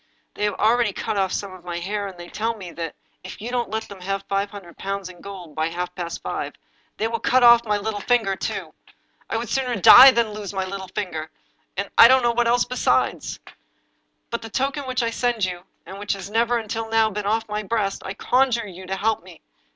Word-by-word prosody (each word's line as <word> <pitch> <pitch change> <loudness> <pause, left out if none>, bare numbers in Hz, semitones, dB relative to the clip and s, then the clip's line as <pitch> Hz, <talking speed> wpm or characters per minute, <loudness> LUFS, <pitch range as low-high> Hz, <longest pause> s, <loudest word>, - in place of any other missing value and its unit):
They 210 - -2
have 205 -2 -1
already 230 -1 +2
cut - - -3
off 190 -2 +1
some 195 -1 -3
of 185 -2 -13
my 175 -1 -4
hair, 200 +3 -3
and 190 -2 -10
they 175 0 -9
tell 225 +4 -2
me 185 -5 -9
that, 165 -2 -6 0.3
if 185 - -9
you 230 +4 -5
don't 245 -1 -1
let 220 +1 -2
them 200 -2 -12
have 195 +1 -3
five 200 +1 0
hundred 195 -5 -11
pounds 195 -1 -4
in 180 -1 -14
gold 185 -5 -9
by 155 +1 0
half 180 +2 -4
past 175 -2 -6
five, - - -4 0.4
they 220 - 0
will 230 0 -2
cut 255 +3 +3
off 235 0 +7
my 210 0 +2
little 205 0 -3
finger 220 -3 +1
too. - - -4 0.6
I - - -1
would 235 +1 -3
sooner 255 0 -1
die 250 +6 +10
than 235 -4 +1
lose 205 -2 -6
my 190 -1 -1
little 190 0 -6
finger 160 -6 -3 0.2
— - - -44
and 200 +1 -1
— - - -47
I 230 - +12
don't 260 +1 +5
know 240 - +3
what 235 0 +1
else 240 +1 +3
besides. 255 - 0 0.5
" - - -47
By 235 - -1
the 225 - -9
token 270 +3 -2
which 255 -1 0
I 230 - 0
send 235 -3 0
you, 180 -1 -6 0.2
and 195 +1 -9
which 205 0 -1
has 195 0 -7
never, 235 +2 +2
until 225 0 -4
now, 225 -1 +3
been 205 0 -4
off 225 +2 0
my 210 0 -2
breast, 210 -2 -1
I 190 - -5
conjure 250 -1 +2
you 185 -1 -10
to 190 - -2
help 220 +3 0
'me. - - -15
210 Hz, 240 wpm, -23 LUFS, 190-230 Hz, 0.6 s, I